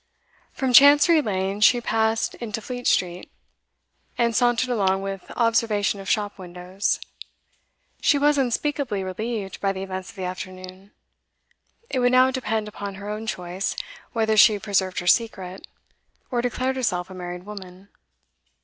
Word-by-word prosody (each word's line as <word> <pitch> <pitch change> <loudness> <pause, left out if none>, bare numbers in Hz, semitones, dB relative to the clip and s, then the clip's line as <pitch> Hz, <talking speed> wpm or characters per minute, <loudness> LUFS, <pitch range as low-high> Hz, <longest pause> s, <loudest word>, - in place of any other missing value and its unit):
From 260 -2 -2
Chancery 290 +5 +7
Lane 195 -3 -2
she 240 +3 +6
passed 225 -1 0
into 225 -2 -5
Fleet 245 +3 -5
Street, 180 0 0 0.9
and 235 -2 +1
sauntered 245 +2 +2
along 195 -4 +1
with 195 -1 -6
observation 225 -3 +1
of 195 - -7
shop 205 -1 -1
windows. 180 +2 -3 1.0
She 290 - +4
was 295 +1 +3
unspeakably 255 -4 -1
relieved 200 +1 -4
by 195 - +1
the 190 0 -5
events 190 0 -6
of 225 - -13
the 190 - -6
afternoon; 185 +1 -8 1.0
it 260 - -2
would 245 0 +3
now 255 +1 +5
depend 220 -4 -2
upon 200 -1 -7
her 200 +2 -6
own 215 +1 -5
choice 180 0 -3 0.4
whether 220 -2 +1
she 215 0 +7
preserved 195 -3 -1
her - - -8
secret, 190 -3 0 0.6
or 240 -1 +1
declared 255 +2 -1
herself 185 -7 -1
a - - -8
married 180 0 -7
woman. 195 -2 -10
210 Hz, 145 wpm, -24 LUFS, 190-240 Hz, 1.0 s, Chancery